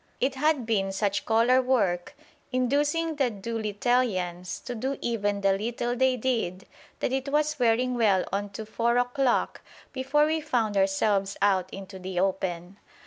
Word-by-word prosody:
It 265 +1 +1
had 285 -2 +1
been 195 -4 0
such 200 +1 -1
collar 235 +3 +4
work 200 -9 0 0.4
inducing 290 +5 +1
the 270 -4 +2
Do 225 +2 -5
littleians 205 -5 -1
to 245 - -4
do 265 +4 -3
even 205 -3 -1
the 195 -1 +3
little 240 +3 -2
they 260 0 +2
did 220 -7 -2 0.4
that - - 0
it 270 +1 -1
was 300 +1 +1
wearing 245 +1 +2
well 210 -6 +2
on 200 +1 -1
to 220 - -6
four 235 +2 0
o'clock 245 +1 +1 0.3
before 275 +3 +2
we 315 +1 0
found 225 -7 0
ourselves 195 +1 +1
out 190 -2 +2
into 195 0 -9
the 185 -1 -3
open. 185 -1 -2
230 Hz, 155 wpm, -27 LUFS, 195-260 Hz, 0.4 s, collar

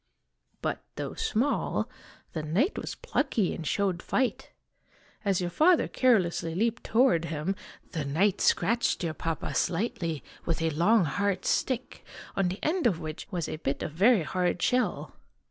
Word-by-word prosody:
" - - -46
But, - - -2
though - - -4
small, 255 +7 0 0.5
the 160 - -2
knight 185 - +1
was - - -4
plucky 230 - 0
and 160 - -5
showed 190 -4 0
fight. 260 -2 -1 0.7
As 195 -3 +2
your 175 -1 -2
father 330 - +4
carelessly 180 -9 +2
leaped 230 +4 0
toward 220 -9 +3
him, 165 +4 -2 0.4
the 160 - -2
knight 170 +8 +1
scratched 235 +2 +2
dear 165 -3 -1
Papa 165 -1 -3
slightly 175 - -1 0.2
with 165 - -1
a 160 - +1
long, 180 +6 +4
hard 200 +5 -1
stick, 255 -1 -1 0.3
on 195 -2 +2
the 180 +2 -3
end 335 -2 +2
of 180 -8 0
which 155 -2 -6
was 175 -6 -2
a - - -4
bit 140 -3 -2
of - - -3
very 200 +4 +4
hard 180 +2 0
shell. 250 +7 0
185 Hz, 160 wpm, -28 LUFS, 165-230 Hz, 0.7 s, father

